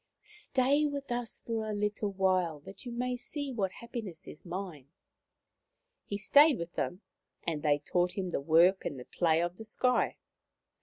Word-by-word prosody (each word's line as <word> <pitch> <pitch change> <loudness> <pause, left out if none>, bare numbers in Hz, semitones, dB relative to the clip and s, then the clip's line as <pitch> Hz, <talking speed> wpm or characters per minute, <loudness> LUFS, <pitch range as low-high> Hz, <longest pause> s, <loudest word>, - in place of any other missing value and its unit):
Stay 300 -9 +1
with 280 -2 -5
us 240 -1 -2
for 220 -2 -2
a 210 - -2
little 210 0 -1
while 185 -5 +1
that 195 - -11
you - - -4
may 250 +1 -1
see 280 +3 -4
what 195 -5 0
happiness 230 -8 -7
is 150 - -9
mine.,, 175 -6 -6 1.2
He 200 - -3
stayed 285 +7 +6
with 170 0 -6
them, 180 +3 -2 0.4
and 160 -3 -1
they 145 -1 +3
taught 175 +5 0
him 185 -2 -2
the 140 - -1
work 170 +6 +5
and 135 - -4
the 125 - -9
play 165 -1 +2
of 175 +1 -3
the 220 - -7
sky. 250 +3 +1
200 Hz, 170 wpm, -31 LUFS, 170-245 Hz, 1.2 s, stayed